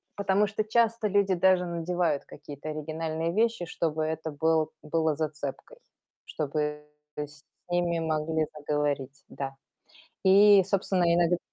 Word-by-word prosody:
потому 200 Hz, +1 st, +2 dB
что 215 Hz, +1 st, -2 dB
часто 230 Hz, 0 st, +2 dB
люди 200 Hz, -1 st, +2 dB
даже 185 Hz, 0 st, +3 dB
надевают 170 Hz, -3 st, -1 dB
какие-то 145 Hz, +1 st, -9 dB
оригинальные 160 Hz, +2 st, -3 dB
вещи, 225 Hz, -4 st, +1 dB
чтобы 160 Hz, -1 st, -2 dB
это 160 Hz, 0 st, -3 dB
был 160 Hz, +1 st, +1 dB
было 160 Hz, 0 st, 0 dB
зацепкой, 150 Hz, -, -5 dB, 0.5 s
чтобы 150 Hz, 0 st, -3 dB, 0.3 s
с 150 Hz, 0 st, -7 dB, 0.3 s
ними 175 Hz, -1 st, +1 dB
могли 160 Hz, 0 st, 0 dB
заговорить, 145 Hz, -2 st, -2 dB
да. 135 Hz, -1 st, -5 dB, 0.7 s
И 200 Hz, 0 st, +7 dB
собственно, 190 Hz, -2 st, +1 dB
иног 175 Hz, 0 st, +3 dB
160 Hz, 120 wpm, -28 LUFS, 150-190 Hz, 0.7 s, И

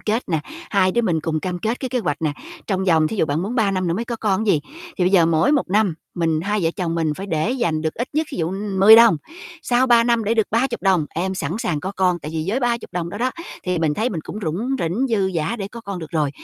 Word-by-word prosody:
kết 220 Hz, +1 st, -2 dB
nè, 160 Hz, -3 st, 0 dB, 0.3 s
hai 185 Hz, -2 st, +3 dB
đứa 235 Hz, -, +1 dB
mình 175 Hz, -7 st, +1 dB
cùng 155 Hz, 0 st, -2 dB
cam 180 Hz, +1 st, -3 dB
kết 220 Hz, +7 st, -2 dB
cái 260 Hz, -, -3 dB
kế 250 Hz, -, -1 dB
hoạch 155 Hz, -9 st, -2 dB
nè, 155 Hz, -2 st, +1 dB, 0.3 s
trong 190 Hz, -2 st, -1 dB
vòng 160 Hz, -4 st, +3 dB
thí 220 Hz, -, -4 dB
dụ 175 Hz, -, +2 dB
bạn 150 Hz, +4 st, -1 dB
muốn 215 Hz, +5 st, -3 dB
3 220 Hz, -5 st, +2 dB
năm 185 Hz, -1 st, -1 dB
nữa 170 Hz, -, 0 dB
mới 225 Hz, +6 st, -2 dB
có 235 Hz, 0 st, -4 dB
con 210 Hz, -4 st, +1 dB
chứ 220 Hz, -, -2 dB
gì, 160 Hz, -7 st, +3 dB
thì 325 Hz, -, -5 dB
bây 180 Hz, -, +3 dB
giờ 175 Hz, -4 st, +5 dB
mỗi 165 Hz, -, +3 dB
một 285 Hz, -9 st, +1 dB
năm 205 Hz, -3 st, +2 dB, 0.2 s
mình 165 Hz, -3 st, 0 dB
hai 205 Hz, +4 st, -1 dB
vợ 165 Hz, -, +2 dB
chồng 175 Hz, -4 st, -2 dB
mình 160 Hz, -2 st, 0 dB
phải 195 Hz, +5 st, -7 dB
để 165 Hz, +3 st, 0 dB
dành 170 Hz, -12 st, -1 dB
được 160 Hz, -1 st, -2 dB
ít 240 Hz, +3 st, -3 dB
nhất 310 Hz, +2 st, 0 dB
thí -, -, -6 dB
dụ, 165 Hz, -, 0 dB
ưm, 195 Hz, +2 st, -3 dB
10 215 Hz, +3 st, +10 dB
đồng, 230 Hz, -7 st, +7 dB, 0.5 s
sau 250 Hz, -1 st, +2 dB
3 235 Hz, -2 st, +5 dB
năm 235 Hz, -2 st, +2 dB
để 220 Hz, -, +1 dB
được 220 Hz, -2 st, +2 dB
30 240 Hz, +3 st, 0 dB
đồng, 185 Hz, -6 st, +2 dB
em 190 Hz, +3 st, -2 dB
sẵn 185 Hz, -, -3 dB
sàng 195 Hz, -11 st, -1 dB
có 190 Hz, +4 st, -4 dB
con. 180 Hz, -2 st, +2 dB
Tại 155 Hz, -, -7 dB
vì 160 Hz, -1 st, -2 dB
với 240 Hz, +7 st, 0 dB
30 240 Hz, -1 st, +1 dB
đồng 175 Hz, -1 st, -3 dB
đó 205 Hz, -, -7 dB
đó, 255 Hz, +2 st, +1 dB, 0.3 s
thì 180 Hz, -1 st, 0 dB
mình 160 Hz, -2 st, +1 dB
thấy 225 Hz, +8 st, 0 dB
mình 170 Hz, -, -3 dB
cũng 195 Hz, -, -7 dB
rủng 180 Hz, +10 st, -2 dB
rỉnh, 195 Hz, +10 st, 0 dB
dư 200 Hz, -5 st, +1 dB
dả 165 Hz, +8 st, -1 dB
để 195 Hz, -2 st, -5 dB
có 235 Hz, +3 st, -9 dB
con 200 Hz, -4 st, -6 dB
được 160 Hz, -3 st, -8 dB
rồi. 150 Hz, -4 st, 0 dB
190 Hz, 295 wpm, -21 LUFS, 165-230 Hz, 0.5 s, 10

